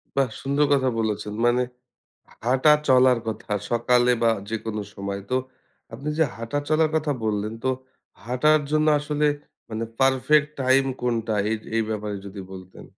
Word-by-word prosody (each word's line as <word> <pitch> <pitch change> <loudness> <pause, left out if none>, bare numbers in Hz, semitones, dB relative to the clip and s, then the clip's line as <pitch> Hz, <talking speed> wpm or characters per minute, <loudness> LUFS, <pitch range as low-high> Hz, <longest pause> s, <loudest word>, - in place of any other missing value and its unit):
বাহ! 135 -3 +2
সুন্দর 140 +2 +2
কথা 130 -2 +2
বলেছেন। 105 -1 -2
মানে 125 +1 +3 0.8
হাঁটা-চলার 130 -1 +4
কথা। 110 -1 -5 0.2
সকালে 120 +1 +3
বা 115 - +5 0.2
যেকোন 110 -1 -4 0.2
সময়। 100 0 -5
তো 130 - +2 0.6
আপনি 135 +6 -6
যে 160 - +5
হাঁটা-চলার 145 +7 0
কথা 150 -2 0
বললেন, 105 0 -1
তো 130 - +3 0.5
হাঁটার 150 +5 +3
জন্য 155 0 +2
আসলে 150 0 0 0.4
মানে 110 +1 -3 0.2
পারফেক্ট 135 +3 +3
টাইম 130 +1 +4 0.2
কোনটা? 115 -3 -1 0.2
এইজ 110 -1 -1 0.2
এই 115 - +3
ব্যাপারে 105 -1 -3
যদি 100 0 -8
বলতেন? 95 0 -11
125 Hz, 140 wpm, -24 LUFS, 110-145 Hz, 0.8 s, বা